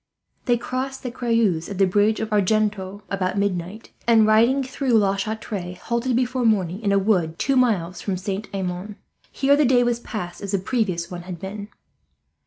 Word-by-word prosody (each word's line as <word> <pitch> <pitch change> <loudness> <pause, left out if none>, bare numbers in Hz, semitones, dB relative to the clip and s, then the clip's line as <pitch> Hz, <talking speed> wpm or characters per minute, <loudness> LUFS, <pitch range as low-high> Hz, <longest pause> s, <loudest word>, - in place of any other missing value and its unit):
They 240 -2 +3
crossed 260 +3 -4
the 250 - -4
Creuse 230 -9 0
at 200 - -5
the 195 - +5
bridge 205 +3 +2
of 220 0 -3
Argenton 205 -1 0
about 190 0 -1
midnight 200 +1 -2 0.2
and, 225 -2 +6
riding 230 +6 +4
through 260 0 -2
La 200 -2 +2
Chatre, 195 -3 -4
halted 235 +6 -1
before 250 +1 0
morning 195 -4 +1
in 205 -3 0
a 200 - +4
wood 185 -5 +1
two 275 - +1
miles 190 -9 +1
from 195 -2 -2
Saint 195 +3 -4
Amand. 190 +1 -4 0.4
Here 280 +1 +3
the 300 - +3
day 250 -2 +4
was 240 -1 0
passed 180 -7 -6
as 200 0 -5
the - - +3
previous 190 -4 -1
one 175 -1 -5
had 175 -1 -8
been. 200 +2 -6
210 Hz, 185 wpm, -23 LUFS, 185-235 Hz, 0.4 s, and